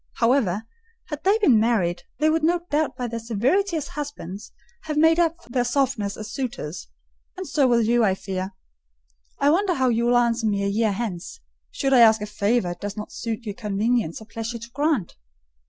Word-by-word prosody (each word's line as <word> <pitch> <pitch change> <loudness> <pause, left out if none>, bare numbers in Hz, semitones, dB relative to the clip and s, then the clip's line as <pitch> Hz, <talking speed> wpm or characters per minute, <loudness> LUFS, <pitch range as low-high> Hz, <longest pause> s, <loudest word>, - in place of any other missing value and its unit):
However, 230 -5 +1 0.5
had 300 -2 -5
they 395 +3 +4
been 275 - +4
married, 190 -7 +1 0.2
they 305 +4 +2
would 320 0 0
no 345 +2 +2
doubt 300 +1 +1
by 250 - -3
their 230 0 -4
severity 265 - +1
as 295 -2 -4
husbands 225 - -7 0.3
have 305 -1 -3
made 320 +2 +5
up 335 0 +1
for - - -20
their 245 0 +1
softness 245 -5 0
as 215 0 -7
suitors; 230 - -5 0.5
and 375 -1 -5
so 280 -4 +2
will 235 -2 +3
you, 235 +1 +3
I 195 -3 +3
fear. 190 0 -5 0.8
I 285 - +3
wonder 370 +2 +2
how 260 -3 +2
you 235 0 +1
will 245 0 +4
answer 235 -1 +2
me 200 -1 0
a - - +1
year 215 +2 +1
hence, 205 - -5 0.3
should 275 - -1
I 255 - +6
ask 220 -1 +7
a 210 - -4
favour 210 -1 0
it 175 - -9
does 205 +1 -5
not 210 - -6
suit 230 0 -5
your 205 - -3
convenience 210 -3 -1
or 220 - -12
pleasure 225 +2 -5
to 235 +1 -11
grant." 285 - 0
235 Hz, 205 wpm, -24 LUFS, 210-285 Hz, 0.8 s, ask